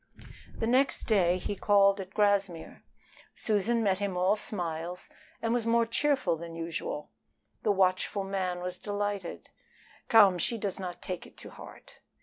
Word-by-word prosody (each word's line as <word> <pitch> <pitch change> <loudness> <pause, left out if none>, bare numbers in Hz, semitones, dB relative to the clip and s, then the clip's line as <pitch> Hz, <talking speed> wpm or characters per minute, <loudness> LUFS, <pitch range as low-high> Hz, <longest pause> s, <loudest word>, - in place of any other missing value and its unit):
The - - -1
next 255 +4 +2
day 185 -5 +3
he 195 +2 -4
called 200 0 +4
at 190 0 -8
Grassmere. 200 -5 0 0.5
Susan 225 +2 +1
met 195 -2 +1
him 200 -3 -2
all 185 +3 +3
smiles 175 -4 -4 0.4
and 230 0 +1
was 235 -2 0
more 230 0 +3
cheerful 260 - +1
than 165 0 -8
usual. 165 -2 -5 0.5
The 210 - +2
watchful 190 +1 +1
man 185 -2 -2
was 180 0 -4
delighted. 205 -3 -4 0.6
"Come, 200 -5 +6
she 230 - 0
does 200 -3 -3
not 180 -2 -6
take 180 -2 -5
it - - -21
to - - -10
heart." - - -13
195 Hz, 150 wpm, -29 LUFS, 180-210 Hz, 0.6 s, Come